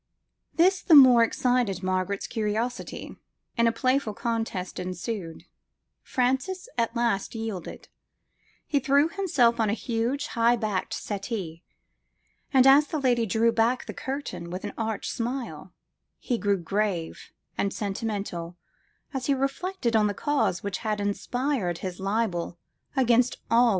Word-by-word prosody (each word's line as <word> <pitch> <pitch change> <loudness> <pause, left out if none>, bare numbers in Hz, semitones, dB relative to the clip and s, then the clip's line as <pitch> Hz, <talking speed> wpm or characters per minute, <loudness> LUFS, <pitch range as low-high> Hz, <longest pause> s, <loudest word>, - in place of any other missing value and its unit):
"This 370 +3 +4
the 330 - +5
more 255 -4 +9
excited 230 -5 +1
Margaret's 185 +1 -1
curiosity, 225 +2 -3 0.4
and 235 -1 +3
a - - +4
playful 255 -2 0
contest 225 -6 -3
ensued: 180 -1 -5 0.6
Francis 265 - -1
at 230 +1 0
last 235 -3 0
yielded: 220 -6 -6 0.8
he 290 - +1
threw 280 +3 +3
himself 290 -12 +2
on 220 -2 +2
a - - +1
huge 240 +5 -1
high 235 0 +3
backed 210 -5 -2
settee; 195 -5 -5 0.9
and 265 -2 +5
as 280 +2 +7
the 320 - -3
lady 240 -4 +2
drew 225 +4 +3
back 230 +2 +1
the - - -6
curtain 265 -10 -5
with 180 +2 -5
an 205 - -5
arch 220 -2 -3
smile, 230 - -4 0.5
he 240 -2 -2
grew 200 -1 +2
grave 180 -1 -2 0.2
and 200 - 0
sentimental, 195 -5 -4 0.6
as 265 -2 -3
he 280 - +3
reflected 275 -1 -1
on 215 -1 +4
the 205 - -2
cause 275 -9 0
which 200 -2 -3
had 215 -2 -2
inspired 205 - -1
his 185 0 -5
libel 195 -4 -1 0.4
against 245 -2 +3
all 230 - +5
womankind. - - +4
230 Hz, 140 wpm, -26 LUFS, 200-255 Hz, 0.9 s, more